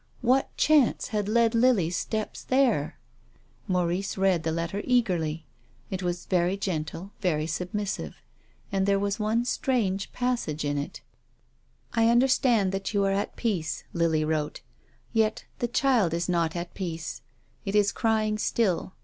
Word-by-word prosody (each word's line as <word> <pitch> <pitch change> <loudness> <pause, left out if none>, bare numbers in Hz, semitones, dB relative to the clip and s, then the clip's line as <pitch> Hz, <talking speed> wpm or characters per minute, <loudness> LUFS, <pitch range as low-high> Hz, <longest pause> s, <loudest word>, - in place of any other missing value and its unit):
What 255 +3 +2
chance 300 -5 +3
had 210 -3 -1
led 230 +1 +3
Lily's 225 -8 +3
steps 215 +3 -3
there? 255 - +1 0.7
Maurice 180 +2 0
read 190 -3 +3
the 160 0 -1
letter 170 +5 -2
eagerly. 170 -11 +1 0.5
It 190 -1 -3
was 175 -1 -2
very 180 +1 +1
gen 175 -6 -1
tle, 180 +6 -8
very 155 -5 +1
submissive. 185 +4 -3 0.6
And 195 0 +1
there 200 0 +4
was 200 +2 -1
one 220 +3 +1
strange 215 -7 0
passage 240 -12 -1
in 145 0 0
it: 140 - -6 0.5
" - - -35
I 230 -1 +4
understand 240 -4 +3
that 195 +2 -3
you 200 -1 +3
are 195 - +2
at 200 +1 -1
peace," 185 -9 -2
Lily 160 -2 +1
Avrote. 155 -1 -2 0.3
" - - -35
Yet 220 -1 +1
the 240 - 0
child 240 -8 +2
is 170 0 -1
not 170 -2 0
at 175 0 -5
peace. 165 -4 -5 0.4
It 200 0 -3
is 205 -1 +4
crying 215 -2 +1
still. 190 -5 0
195 Hz, 155 wpm, -27 LUFS, 170-225 Hz, 0.7 s, there